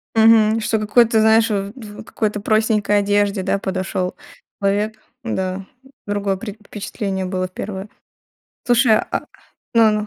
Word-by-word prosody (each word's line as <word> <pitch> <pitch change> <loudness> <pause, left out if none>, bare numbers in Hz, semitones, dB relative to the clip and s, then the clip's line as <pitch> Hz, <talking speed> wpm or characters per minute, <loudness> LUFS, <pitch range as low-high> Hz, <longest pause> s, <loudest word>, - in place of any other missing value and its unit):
Мгм. 225 0 +5
Что 220 0 0
какой-то, 220 +2 +3
знаешь, 220 +1 +4
в 200 -1 -2
в 215 -5 -10
какой-то 215 -2 -2
простенькой 215 -1 +2
одежде, 205 0 +1
да, 195 +1 0
подошел 185 -1 -2 0.5
человек. 205 +2 +1 0.3
Да, 190 -4 -3 0.4
другое 205 -1 -1
пре 210 +2 -6
впечатление 195 -2 -4
было 185 0 -2
первое. 190 +2 -6 0.8
Слушай, 240 -3 +4
а - - 0 0.5
ну 225 -1 +6
ну. 210 0 -1
210 Hz, 130 wpm, -20 LUFS, 195-220 Hz, 0.8 s, ну